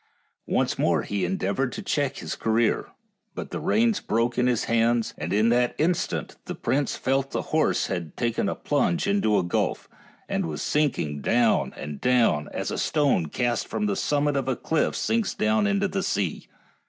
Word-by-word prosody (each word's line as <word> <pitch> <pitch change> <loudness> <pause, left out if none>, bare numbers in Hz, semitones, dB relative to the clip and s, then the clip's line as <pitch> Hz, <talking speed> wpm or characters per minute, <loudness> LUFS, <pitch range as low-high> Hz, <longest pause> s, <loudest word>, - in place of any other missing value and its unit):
Once - - 0
more - - +2
he 100 -2 -2
en 90 +1 0
deavored 125 +8 -1
to 205 - -6
check 140 -7 -1
his - - -4
career, 110 0 +1 0.5
but - - -6
the - - -3
reins 225 -1 +2
broke 115 +2 0
in 125 0 +2
his 125 -3 +1
hands, 115 0 +1
and 80 +3 -5
in 105 +3 +3
that 120 +1 +2
instant 170 +2 -1
the - - -5
prince 140 0 0
felt 135 +1 0
the - - -2
horse 155 0 +2
had 85 -4 -4
taken 120 -2 0
a - - -2
plunge 145 +4 0
into 200 - +2
a - - +2
gulf, 85 - -1 0.4
and - - -1
was 75 -2 -4
sinking 100 - 0
down 115 - +2
and 75 -1 -7
down, 120 -12 +2
as - - -3
a - - -2
stone 140 - +2
cast 120 +8 -1
from 110 -2 -2
the 100 -1 0
summit 145 0 +1
of 135 -2 -1
a 130 - +1
cliff 160 +6 0
sinks 225 -2 0
down 220 0 +2
to 200 - +1
the 195 +1 -2
sea. 100 - -2
120 Hz, 190 wpm, -25 LUFS, 105-150 Hz, 0.5 s, in